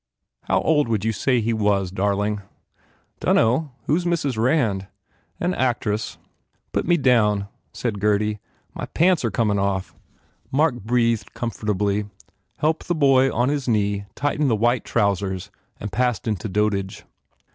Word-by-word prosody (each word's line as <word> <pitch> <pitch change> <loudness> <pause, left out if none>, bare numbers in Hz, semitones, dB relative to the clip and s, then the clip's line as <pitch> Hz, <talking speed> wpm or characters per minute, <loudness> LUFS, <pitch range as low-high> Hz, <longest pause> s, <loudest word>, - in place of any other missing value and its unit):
"How - - +2
old 150 -4 +2
would 110 -3 -1
you 110 - +2
say 125 +3 +1
he 115 +1 0
was, 100 -4 +1
darling?" 100 +2 0 0.8
"Dunno. 130 +6 +2
Who 150 - +2
s 180 - -2
Mrs. 170 -7 0
Rand?" 110 -5 +1 0.5
"An 180 +1 0
actress." 115 -6 -1 0.5
"Put - - -1
me 175 0 +4
down," 105 -7 +3 0.2
said 110 -1 -3
Gurdy, 105 +1 +1 0.3
"My - - -5
pants 175 -1 +2
are 115 - +1
comin 105 -1 +1
off." 95 -1 -1 0.6
Mark 150 +2 +3
breathed 115 -1 0
comfortably, 105 -3 -1 0.5
helped 155 +2 0
the 175 - +1
boy 135 -3 +4
on 120 +2 +1
his 145 -3 -2
knee 100 -3 +1
tighten 145 0 0
the 115 - +3
white 120 +3 +1
trousers 100 -2 -1 0.3
and 105 - -5
passed 125 0 0
into 105 -1 -2
dotage. 100 -1 -1
110 Hz, 145 wpm, -23 LUFS, 100-130 Hz, 0.8 s, me